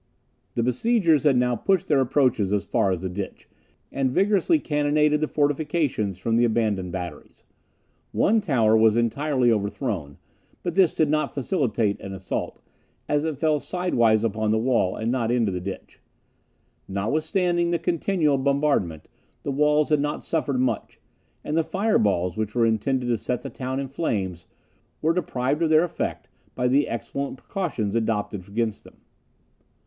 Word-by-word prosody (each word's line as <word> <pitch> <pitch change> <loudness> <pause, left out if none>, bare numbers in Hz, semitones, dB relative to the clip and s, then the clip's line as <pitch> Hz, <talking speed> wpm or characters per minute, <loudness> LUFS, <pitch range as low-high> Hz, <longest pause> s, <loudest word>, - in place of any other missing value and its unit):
The 115 - +1
besiegers 160 - +2
had 140 -4 +4
now 125 0 +2
pushed 190 - +1
their 145 -3 +3
approaches 125 -6 +2
as 105 -1 0
far 95 - +1
as 90 -2 -2
the - - -1
ditch, 95 +2 -6 0.4
and 135 -1 0
vigorously 200 - +3
cannonaded 150 - +1
the 155 - +1
fortifications 145 - 0
from 115 +4 0
the 120 - +4
abandoned 110 -6 0
batteries. 85 -4 -8 0.7
One 220 +1 +2
tower 115 - +3
was 110 0 +4
entirely 125 +2 +1
overthrown, 100 - -2 0.5
but 175 - -2
this 190 -3 +4
did 155 - +1
not 155 +1 0
facilitate 125 - 0
an 100 - -7
assault, 95 0 -5 0.4
as 150 +1 +1
it 155 -3 -2
fell 155 0 +1
sidewise 120 - +1
upon 110 -1 0
the 110 - +2
wall, 115 -5 +1
and 110 +2 -2
not 120 -3 0
into 120 -4 +1
the 90 -1 -4
ditch. 95 +1 -8 0.9
Notwithstanding 160 - 0
the 170 - +1
continual 165 -3 +1
bombardment, 140 - 0 0.4
the 140 - -2
walls 150 +2 +2
had 150 -1 +3
not 145 +1 -2
suffered 145 -5 -1
much; 130 -1 -2 0.4
and 150 - -3
the 165 - +3
fire 205 +6 +1
balls, 90 -3 +1
which 110 0 -3
were 120 -1 +3
intended 125 +4 0
to 120 -2 0
set 125 +4 -3
the - - -6
town 130 +1 -4
in 140 - -3
flames, 95 - -3 0.5
were 160 +2 +2
deprived 145 -4 -1
of 165 - +2
their 155 +1 +5
effect 175 -1 -4 0.3
by 125 - +1
the 140 +3 +3
excellent 140 +4 -4
precautions 125 - -3
adopted 105 -4 -2
against 110 +1 -2
them. - - -16
130 Hz, 160 wpm, -24 LUFS, 110-155 Hz, 0.9 s, their